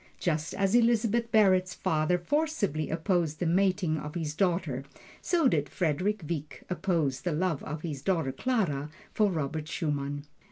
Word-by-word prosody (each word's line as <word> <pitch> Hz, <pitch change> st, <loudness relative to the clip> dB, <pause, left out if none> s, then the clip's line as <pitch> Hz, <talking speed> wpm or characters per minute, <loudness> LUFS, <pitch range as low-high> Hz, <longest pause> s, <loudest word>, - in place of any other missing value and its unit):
Just 160 Hz, -2 st, -1 dB
as 195 Hz, -1 st, +1 dB
Elizabeth 235 Hz, -1 st, +3 dB
Barrett's 185 Hz, -4 st, +4 dB
father 155 Hz, +3 st, +1 dB
forcibly 200 Hz, -, 0 dB
opposed 165 Hz, -1 st, 0 dB
the 175 Hz, -, -1 dB
mating 180 Hz, -2 st, +2 dB
of 150 Hz, +2 st, -7 dB
his 160 Hz, -3 st, -2 dB
daughter, 170 Hz, -6 st, 0 dB, 0.4 s
so 335 Hz, -5 st, +2 dB
did 150 Hz, -, +1 dB
Frederick 185 Hz, +6 st, 0 dB
Wieck 150 Hz, -3 st, -5 dB
oppose 170 Hz, -8 st, 0 dB
the 175 Hz, -3 st, -1 dB
love 165 Hz, -2 st, 0 dB
of 155 Hz, 0 st, -5 dB
his 150 Hz, -5 st, -4 dB
daughter 165 Hz, -6 st, 0 dB
Clara 155 Hz, -, -1 dB, 0.2 s
for 210 Hz, -2 st, +3 dB
Robert 155 Hz, -1 st, -3 dB
Schumann. 145 Hz, -3 st, -2 dB
170 Hz, 150 wpm, -29 LUFS, 150-195 Hz, 0.4 s, Barrett's